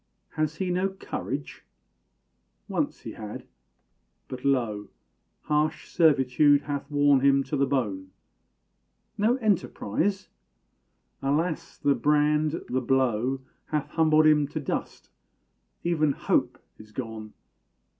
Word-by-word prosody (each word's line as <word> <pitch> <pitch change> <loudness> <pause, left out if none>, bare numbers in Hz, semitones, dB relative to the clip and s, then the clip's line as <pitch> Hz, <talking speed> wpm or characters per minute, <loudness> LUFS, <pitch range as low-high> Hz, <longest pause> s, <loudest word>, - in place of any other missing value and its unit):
Has 155 0 -2
he 185 +1 -2
no 185 +2 +1
courage? 150 -6 -6 1.0
Once - - -2
he - - -7
had 105 -1 -8 0.8
but, 130 -1 -8
lo! 115 -7 0 0.6
Harsh 150 +1 0
servitude 145 -2 +4
hath 140 -1 -4
worn 145 -1 +4
him 140 0 +4
to 150 - -4
the 140 -1 +2
bone. 105 -9 -2 1.1
No 220 +4 +2
enterprise? 200 - -1 0.9
Alas! 155 +4 -1
the 140 - +2
brand, 150 +2 +1
the 130 +1 -1
blow, 130 0 +1 0.3
Hath 150 -2 -2
humbled 155 -1 +4
him 150 -2 +4
to 150 +2 -4
dust 145 - -5 0.7
even 155 -4 +2
hope - - 0 0.2
is 110 0 -14
gone! 110 -3 -6
145 Hz, 110 wpm, -26 LUFS, 130-155 Hz, 1.1 s, servitude